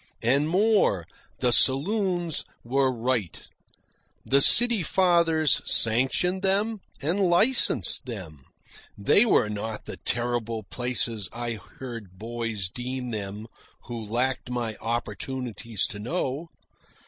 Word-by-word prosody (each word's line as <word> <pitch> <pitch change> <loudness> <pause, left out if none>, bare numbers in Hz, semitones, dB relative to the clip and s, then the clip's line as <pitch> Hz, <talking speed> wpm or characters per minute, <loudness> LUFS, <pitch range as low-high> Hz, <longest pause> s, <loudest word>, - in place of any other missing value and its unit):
And 140 +6 +2
more, 190 - +2 0.4
the 125 -1 +3
saloons 175 - +1 0.2
were 130 +2 +1
right. 120 -7 -2 0.9
The 140 +1 +4
city 235 - +7
fathers 170 -4 +3
sanctioned 130 +11 +2
them 205 +3 0 0.2
and 170 +7 0
licensed 175 - +3
them. 85 - -8 0.5
They 200 - +5
were 155 - +3
not 105 +1 -5
the - - -7
terrible 120 -2 -3
places 115 -1 -2
I 120 -2 -5 0.2
heard 115 -8 -8
boys 115 -2 -4
deem 125 +4 -5
them 105 0 -5 0.4
who 120 -2 -6
lacked 125 +4 -2
my 120 -3 -3
opportunities 120 -1 -3
to 105 - -7
know. 140 +5 -3
125 Hz, 110 wpm, -26 LUFS, 110-165 Hz, 0.9 s, city